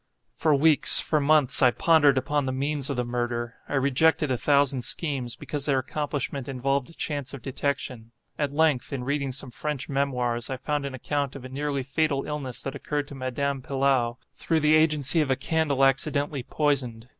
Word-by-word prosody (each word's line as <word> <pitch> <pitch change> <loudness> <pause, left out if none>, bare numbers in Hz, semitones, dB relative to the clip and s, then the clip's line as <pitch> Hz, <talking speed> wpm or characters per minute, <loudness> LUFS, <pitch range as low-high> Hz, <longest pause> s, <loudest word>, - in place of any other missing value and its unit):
For 155 -2 +2
weeks, 150 +1 +7
for 155 - 0
months, 150 -2 +4
I 125 - +6
pondered 145 0 +3
upon 145 +1 -1
the - - -1
means 140 +1 -1
of 140 - -3
the 125 - -1
murder. 120 -1 -3
I - - -2
rejected 140 +2 +2
a - - +2
thousand 140 0 +2
schemes, 130 -2 -2
because 145 -1 -4
their 140 -2 +2
accomplishment 140 0 -3
involved 135 +1 -1
a - - -14
chance 145 -3 -3
of 125 - -12
detection. 130 -4 -3 0.3
At 145 -1 0
length, 150 -3 +1
in 135 -3 -4
reading 140 0 -2
some 130 0 -5
French 150 +1 -4
memoirs, 125 -4 -1
I 130 - -3
found 145 +1 -2
an 135 - -7
account 140 +2 -3
of 135 -2 -9
a - - -8
nearly 140 0 -3
fatal 140 +1 -1
illness 145 -4 -4
that 135 - -4
occurred 145 +1 -3
to - - -9
Madame 135 +1 -3
Pilau, 130 -3 0 0.2
through 160 -1 -1
the 150 +1 +3
agency 155 -1 +3
of 150 - -1
a 130 - +2
candle 140 -1 +1
accidentally 140 +1 0
poisoned. 125 -5 -2
140 Hz, 190 wpm, -25 LUFS, 130-145 Hz, 0.3 s, weeks